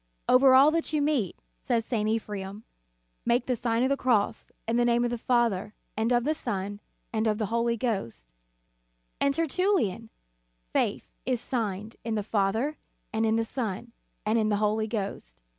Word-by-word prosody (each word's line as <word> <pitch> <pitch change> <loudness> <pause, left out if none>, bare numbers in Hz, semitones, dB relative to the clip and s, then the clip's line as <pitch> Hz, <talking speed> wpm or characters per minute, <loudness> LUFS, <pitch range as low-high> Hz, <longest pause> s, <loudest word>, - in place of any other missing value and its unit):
"Over 260 +1 +7
all 275 +3 +7
that 330 -1 -1
you 305 - +2
meet," 285 - 0 0.2
says 225 - 0
St. 215 -3 0
Ephrem, 210 -2 -3 0.6
"make 240 +1 +2
the 255 - 0
Sign 230 0 0
of 260 - +2
the 275 - +3
Cross, 240 -7 0 0.2
in 230 +1 +1
the 240 - +4
name 240 0 +3
of 240 - -1
the 240 - -1
Father, 225 -5 +1 0.2
and 220 +3 0
of 240 -1 +3
the 305 +4 +1
Son, 205 -7 -4 0.3
and 220 0 +1
of 210 -1 +1
the 215 - -1
Holy 235 0 +1
Ghost/ 195 - -2
f - - -45 0.9
And 280 - +3
Tertullian: 330 - 0 0.6
"Faith - - 0 0.2
is 255 -2 +1
signed 220 -4 -3
in 225 -1 -2
the 210 - -1
Father, 220 +8 0 0.4
and 220 0 +1
in 220 - +2
the 225 0 +1
Son, 230 -1 -4 0.3
and 220 +2 +2
in 215 -1 +1
the 210 - +2
Holy 215 +1 +1
Ghost." 195 - -5
225 Hz, 180 wpm, -28 LUFS, 210-250 Hz, 0.9 s, Over